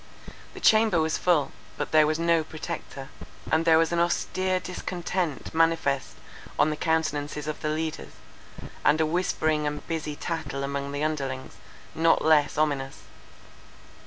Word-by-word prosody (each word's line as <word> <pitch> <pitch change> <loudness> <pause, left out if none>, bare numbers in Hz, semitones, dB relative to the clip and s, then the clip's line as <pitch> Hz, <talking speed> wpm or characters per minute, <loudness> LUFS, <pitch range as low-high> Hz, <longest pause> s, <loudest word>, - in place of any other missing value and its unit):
The - - -7
chamber 215 -5 +4
was 160 0 0
full—but 145 -11 -1
there 155 -1 +5
was 155 0 0
no 165 -1 +2
Protector; 155 -4 -7 0.4
and 160 +1 +2
there 165 -1 +6
was 165 0 +2
an 170 - +1
austere 185 +2 0
discontent 180 -4 -4
manifest 160 -4 +1 0.4
on 155 - +3
the - - -2
countenances 150 -2 -1
of 155 0 -5
the 155 - -1
leaders, 155 0 -3 0.7
and 150 +2 +4
a 160 - +3
whispering 155 -2 0
and 150 0 -4
busy 155 -3 -3
tattle 155 -4 -4
among 140 0 -3
the 145 +1 -3
underlings, 135 -4 -3 0.4
not 165 -1 +3
less 155 -3 +4
ominous. 140 -3 -1
155 Hz, 140 wpm, -26 LUFS, 145-165 Hz, 0.7 s, there